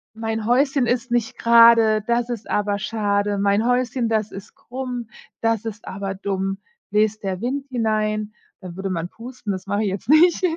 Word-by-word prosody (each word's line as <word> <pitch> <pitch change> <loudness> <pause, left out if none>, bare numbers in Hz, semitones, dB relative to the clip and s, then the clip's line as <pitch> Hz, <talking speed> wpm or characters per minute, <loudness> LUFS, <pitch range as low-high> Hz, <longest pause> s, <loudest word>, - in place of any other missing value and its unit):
„Mein 225 -1 -3
Häuschen 265 +1 +2
ist 245 +1 -1
nicht 240 -2 -1
grade, 230 -2 +6
das 235 0 0
ist 230 -3 -5
aber 205 -1 0
schade. 205 -1 -1
Mein 200 +2 +2
Häuschen, 245 -1 0
das 220 -2 -1
ist 195 +1 -10
krumm, 250 -2 -6 0.3
das 225 -1 0
ist 220 -2 -7
aber 195 0 -4
dumm. 195 0 -3 0.3
Bläst 215 +1 +1
der 190 -2 -3
Wind 270 +4 -3
hinein”, 215 -3 -1 0.3
dann 180 -3 -9
würde 190 +1 -4
man 170 -2 -3
pusten, 230 0 -7
das 185 0 -6
mache 205 +2 0
ich 210 - 0
jetzt 195 +3 -5
nicht, 325 +5 +5
220 Hz, 175 wpm, -22 LUFS, 200-240 Hz, 0.3 s, grade